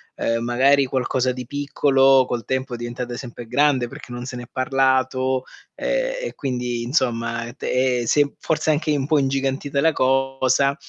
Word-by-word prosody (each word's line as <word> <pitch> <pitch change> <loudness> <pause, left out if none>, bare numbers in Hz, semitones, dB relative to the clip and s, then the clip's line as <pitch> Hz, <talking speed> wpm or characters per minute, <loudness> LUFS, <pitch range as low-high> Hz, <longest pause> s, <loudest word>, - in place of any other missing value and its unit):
Uhm, 115 0 -1
magari, 135 +3 +3
qualcosa 130 0 0
di 125 -1 -6
piccolo 135 -1 +3
col 120 -2 -4
tempo 130 -1 -2
è - - -3
diventata 120 +1 -5
sempre 120 -2 -8
grande 130 0 +2
perché 125 - -11
non 120 0 -6
se 125 -1 -6
n'è 120 - -8
parlato, 130 -1 +1 0.3
ehm, - - -1
e - - -13
quindi 125 -3 -3
insomma, 115 -2 -1
te 125 -3 0
si 145 - +4
è 145 - 0
forse 155 0 0
anche 150 0 0
un 135 - -1
po' 155 -2 +3
ingigantita 135 +1 -1
la 160 - +4
cosa. 135 0 +1
130 Hz, 165 wpm, -22 LUFS, 125-140 Hz, 0.3 s, si